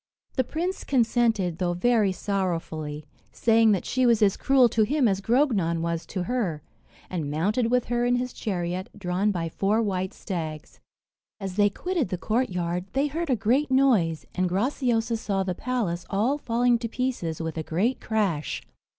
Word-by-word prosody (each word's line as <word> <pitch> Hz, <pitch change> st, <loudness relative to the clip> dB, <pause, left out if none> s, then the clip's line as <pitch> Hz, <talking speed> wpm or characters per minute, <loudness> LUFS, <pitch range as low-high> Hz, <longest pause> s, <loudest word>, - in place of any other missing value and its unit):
The 260 Hz, -, +1 dB
prince 345 Hz, +8 st, -3 dB
consented, 225 Hz, -, +1 dB
though 175 Hz, -2 st, 0 dB
very 215 Hz, 0 st, +3 dB
sorrowfully, 165 Hz, -6 st, -3 dB, 0.3 s
saying 225 Hz, -1 st, +4 dB
that 190 Hz, -, -2 dB
she 255 Hz, -1 st, +2 dB
was 230 Hz, -2 st, +4 dB
as 200 Hz, -2 st, +4 dB
cruel 270 Hz, -2 st, +4 dB
to 225 Hz, -, +1 dB
him 265 Hz, +4 st, +3 dB
as 195 Hz, -2 st, 0 dB
Grognon 205 Hz, -, +2 dB
was 170 Hz, 0 st, -2 dB
to 185 Hz, -, -3 dB
her, 180 Hz, -, -2 dB, 0.4 s
and 165 Hz, -6 st, -3 dB
mounted 205 Hz, -, 0 dB
with 250 Hz, 0 st, +2 dB
her 240 Hz, 0 st, 0 dB
in 245 Hz, 0 st, +3 dB
his 250 Hz, 0 st, -2 dB
chariot, 180 Hz, -2 st, -3 dB
drawn 190 Hz, +1 st, 0 dB
by 175 Hz, -5 st, -1 dB
four 200 Hz, +6 st, +1 dB
white 190 Hz, -4 st, -1 dB
stags. 160 Hz, -5 st, -6 dB, 0.6 s
As 195 Hz, -2 st, -5 dB
they 205 Hz, 0 st, +4 dB
quitted 345 Hz, -, -2 dB
the 185 Hz, -, -2 dB
courtyard, 180 Hz, -5 st, -1 dB
they 275 Hz, +2 st, +2 dB
heard 320 Hz, +3 st, -3 dB
a 255 Hz, -, +4 dB
great 250 Hz, +8 st, +1 dB
noise, 235 Hz, -, +3 dB
and 185 Hz, 0 st, 0 dB
Graciosa 230 Hz, +2 st, 0 dB
saw 195 Hz, -3 st, -1 dB
the 185 Hz, -1 st, -2 dB
palace 200 Hz, -6 st, -2 dB
all 235 Hz, +9 st, +1 dB
falling 240 Hz, -1 st, +2 dB
to 230 Hz, -1 st, -4 dB
pieces 235 Hz, -11 st, -2 dB
with 160 Hz, -1 st, -3 dB
a 160 Hz, -, -2 dB
great 190 Hz, +11 st, 0 dB
crash. 200 Hz, -9 st, -1 dB
210 Hz, 170 wpm, -26 LUFS, 180-245 Hz, 0.6 s, saying